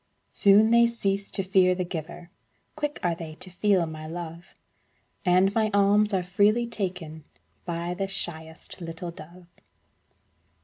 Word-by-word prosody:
Soon 205 +3 +5
they 235 0 +6
cease 200 -4 -2
to 195 - -2
fear 185 -1 +3
the 180 0 -2
giver, 170 +1 -7 0.4
Quick 295 -1 -3
are 175 -1 +2
they 160 -2 -8
to 185 - -10
feel 190 -1 +2
my 155 -1 -7
love, 170 +1 -8 0.7
And 185 +2 +4
my 220 -1 +2
alms 205 +1 +4
are 190 -2 0
freely 205 +6 +2
taken 180 -8 -5 0.4
By 170 0 -3
the 195 +2 -3
shyest 160 -3 -6
little 165 +1 -6
dove. 170 +2 -13
180 Hz, 140 wpm, -26 LUFS, 170-200 Hz, 0.7 s, they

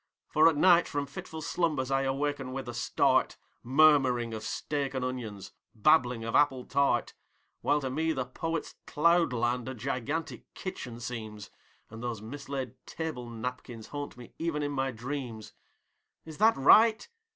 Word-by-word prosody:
For 155 +1 +5
at 160 - -2
night 175 +1 +5
from 145 -1 -2
fitful 155 +3 -8
slumbers 155 -6 -1
I 135 0 +2
awaken 135 -1 -2
with 135 -1 -5
a 120 - -5
start, 120 - +2 0.2
Murmuring 130 -4 +4
of 110 - -5
steak 140 +5 -3
and 130 -1 -1
onions, 115 -6 -5 0.2
babbling 120 -1 +3
of 115 - -4
apple 135 -4 +3
tart. 140 -4 +1 0.5
While 150 - +2
to 135 - -2
me 160 +4 0
the 130 -5 -2
Poet's 165 +5 -4
cloudland 125 -7 +2
a 130 - -5
gigantic 135 +6 -4
kitchen 125 -10 -6
seems, 110 -4 -7 0.4
And 110 0 -9
those 120 -3 -3
mislaid 130 +1 -6
table 150 -7 -5
napkins 120 -1 -6
haunt 145 -3 -6
me 120 -1 -12
even 160 -3 -1
in 145 - -2
my 135 -1 -1
dreams 120 -2 -6 0.7
Is 160 +1 -10
this 220 +2 +5
right? 220 +11 +6
135 Hz, 150 wpm, -29 LUFS, 120-150 Hz, 0.7 s, right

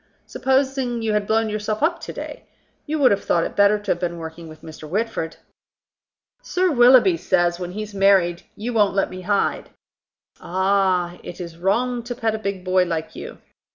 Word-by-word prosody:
Supposing 265 -3 0
you 220 -1 0
had 210 -1 0
blown 225 0 +2
yourself 215 +2 -3
up 335 +1 +1
to - - -6
day! - - -8 0.4
You 310 +1 -1
would 275 -4 +5
have 200 - 0
thought 170 - +1
it - - -5
better 200 +1 +4
to 205 - -3
have 175 - 0
been 175 -1 -3
working 165 0 -8
with 155 0 -13
Mr. 155 -1 -10
Whitford." 205 -4 -2 1.1
"Sir 365 0 0
Willoughby 255 +7 +6
says, 175 - +1
when 180 0 -5
he's 210 0 -6
married, 195 -3 +3
you 235 +4 -4
won't 210 -3 +2
let 195 - +1
me 185 0 -7
hide." 200 +2 -1 0.7
"Ah! 185 -1 0
It 175 - -9
is 170 -2 -7
wrong 240 +7 0
to 240 +1 -6
pet 225 -3 -1
a 220 - -3
big 200 -3 -4
boy 185 0 +3
like 165 -2 -4
you. - - -8
200 Hz, 190 wpm, -22 LUFS, 175-235 Hz, 1.1 s, Willoughby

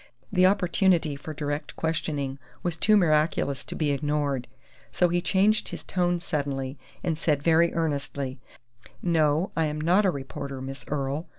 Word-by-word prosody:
The 185 -1 +6
opportunity 180 -5 +2
for 150 +3 -8
direct 145 0 -4
questioning 145 -4 -2 0.2
was 175 -2 +1
too 215 +6 +4
miraculous 155 -5 +2
to - - -4
be 150 -2 +1
ignored. 145 -3 -1 0.4
So 180 - +2
he 175 +1 +1
changed 200 +4 +2
his - - -6
tone 175 -1 0
suddenly 140 -4 -3 0.2
and 170 -3 0
said 150 -3 +1
very 165 +1 +4
earnestly: 140 -4 -2 0.6
"No, 160 0 +2
I 160 - +2
am 150 0 -2
not 175 +7 +3
a 195 - +4
reporter, 140 -2 -5
Miss 135 -1 -7
Earle. 145 +3 -2
155 Hz, 155 wpm, -26 LUFS, 140-175 Hz, 0.6 s, The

